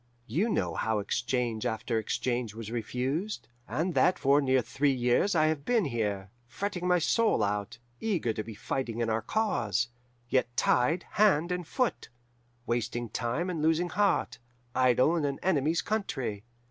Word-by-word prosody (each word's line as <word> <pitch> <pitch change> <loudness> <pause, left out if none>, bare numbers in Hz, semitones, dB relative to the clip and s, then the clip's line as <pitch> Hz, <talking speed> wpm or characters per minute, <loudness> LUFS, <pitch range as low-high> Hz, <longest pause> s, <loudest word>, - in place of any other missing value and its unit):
You 170 - 0
know 90 - 0
how 110 +4 0
exchange 120 +2 -1
after 110 0 -1
exchange 120 0 -2
was 115 -1 -7
refused, 130 - -2 0.2
and 170 +3 -1
that 180 - +3
for 140 +1 +4
near 130 -2 +2
three 145 +4 +1
years 125 +9 +2
I 155 -1 +4
have 155 -2 0
been 230 +2 +2
here, 105 -6 -2 0.2
fretting 180 +6 -3
my 180 0 +4
soul 215 - +2
out, 100 0 -2 0.2
eager 180 - 0
to 110 - -3
be 110 -1 -9
fighting 120 +2 -3
in 115 -1 0
our 110 +1 0
cause, 210 - 0 0.4
yet 120 -1 0
tied 160 +8 +2
hand 190 -6 +3
and 180 -2 -3
foot, 255 +5 -1 0.6
wasting 120 0 -2
time 120 - -2
and 175 -4 -2
losing 165 +3 +2
heart, 200 +4 +1 0.3
idle 130 +5 +4
in 165 - 0
an 140 -1 -1
enemy's 165 -2 +2
country. 135 - -2
130 Hz, 160 wpm, -29 LUFS, 115-175 Hz, 0.6 s, for